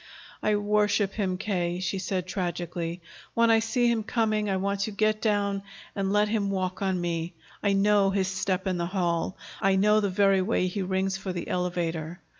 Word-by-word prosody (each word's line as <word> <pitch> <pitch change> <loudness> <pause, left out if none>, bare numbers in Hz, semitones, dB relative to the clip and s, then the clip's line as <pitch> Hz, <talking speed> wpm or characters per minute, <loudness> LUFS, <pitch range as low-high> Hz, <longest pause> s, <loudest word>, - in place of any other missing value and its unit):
"I 215 - +2
worship 205 -1 +2
him, 190 -4 -1
K.," 180 -3 -1
she 185 +1 -2
said 185 -1 -2
tragically. 175 -2 -3 0.3
"When 230 0 +4
I 225 - +6
see 240 +2 +1
him 235 -2 +2
coming, 215 -1 0
I 190 - +1
want 200 +1 -1
to 200 +2 -1
get 215 +1 +1
down 200 -2 +1 0.3
and 195 -1 -1
let 210 +1 +3
him 210 -2 0
walk 185 -1 -2
on 190 -2 0
me. 170 0 -2 0.3
I 200 -1 +2
know 200 0 +4
his 195 -1 +1
step 190 0 -1
in 185 -2 -1
the 170 - -1
hall. 175 -1 -1 0.2
I 195 0 +3
know 210 +2 +4
the 205 -2 0
very 195 0 +3
way 185 -1 +1
he 185 +2 -2
rings 190 +1 0
for 190 0 -4
the 175 - -5
elevator. 175 -2 -2
195 Hz, 195 wpm, -27 LUFS, 180-205 Hz, 0.3 s, I